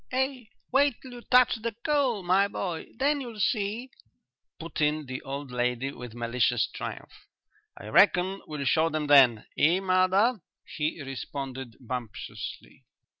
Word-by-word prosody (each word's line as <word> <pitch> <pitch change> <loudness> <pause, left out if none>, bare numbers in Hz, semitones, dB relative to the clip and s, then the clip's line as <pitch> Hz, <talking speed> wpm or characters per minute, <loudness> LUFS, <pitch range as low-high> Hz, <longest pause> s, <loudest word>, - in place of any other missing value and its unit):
"Ah, 265 +2 +1 0.4
wait 275 -1 +3
till 260 - -12
you 245 -1 -9
touch 250 -1 +4
the 225 0 -4
coal, 270 -9 +1
my 190 +3 +3
boy, 180 -4 -4
then 285 +3 +1
you'll 235 -4 -8
see," 220 +4 -1 0.7
put 165 -1 -5
in 150 0 +1
the 130 -1 -6
old 140 0 -6
lady, 125 +2 -1
with 125 -4 -9
malicious 120 0 +1
triumph. - - -8 0.5
"I - - -10
reckon 190 - +4
we'll 150 -2 -4
show 160 +5 +3
them 155 -1 -2
then, 130 -6 +6
eh, 165 +5 +4
mother?" 190 +4 +2 0.2
he 155 0 -3
responded 135 -2 -6
bumptiously. 125 -3 -7
165 Hz, 140 wpm, -27 LUFS, -, 0.7 s, then